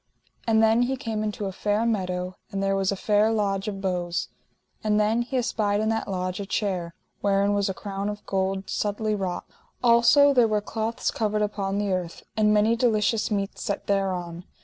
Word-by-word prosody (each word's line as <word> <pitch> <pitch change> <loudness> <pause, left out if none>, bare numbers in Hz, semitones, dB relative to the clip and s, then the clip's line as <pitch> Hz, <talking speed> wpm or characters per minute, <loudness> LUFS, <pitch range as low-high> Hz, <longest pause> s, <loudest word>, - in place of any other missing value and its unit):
And 225 -1 +4
then 225 +2 +4
he 260 +2 0
came 225 -5 -3
into 210 -1 -3
a 195 - -2
fair 210 +4 0
meadow, 185 -4 -1 0.2
and 195 0 -2
there 195 0 +1
was 195 0 +1
a - - -1
fair 210 +2 +2
lodge 200 -2 0
of 195 -2 -4
boughs. 180 -2 -2 0.5
And 210 -1 +2
then 215 +3 +2
he 255 +2 -2
espied 210 -4 0
in 220 0 +1
that 225 0 -1
lodge 185 -1 -3
a 200 - -3
chair, 180 -5 -2 0.2
wherein 200 0 +2
was 200 0 +1
a 190 - -3
crown 200 0 -4
of 210 0 -7
gold, 190 0 -1
subtly 215 +1 -1
wrought. 190 -3 -3 0.4
Also 245 +5 +6
there 245 -3 +5
were 215 -1 +1
cloths 220 +2 -2
covered 210 -1 0
upon 200 -1 -2
the 205 -1 0
earth, 180 -2 -4
and 215 -1 +3
many 215 +2 +4
delicious 225 -2 +1
meats 200 -2 -2
set 200 - -3
thereon. 180 -3 -1
205 Hz, 195 wpm, -25 LUFS, 195-220 Hz, 0.5 s, Also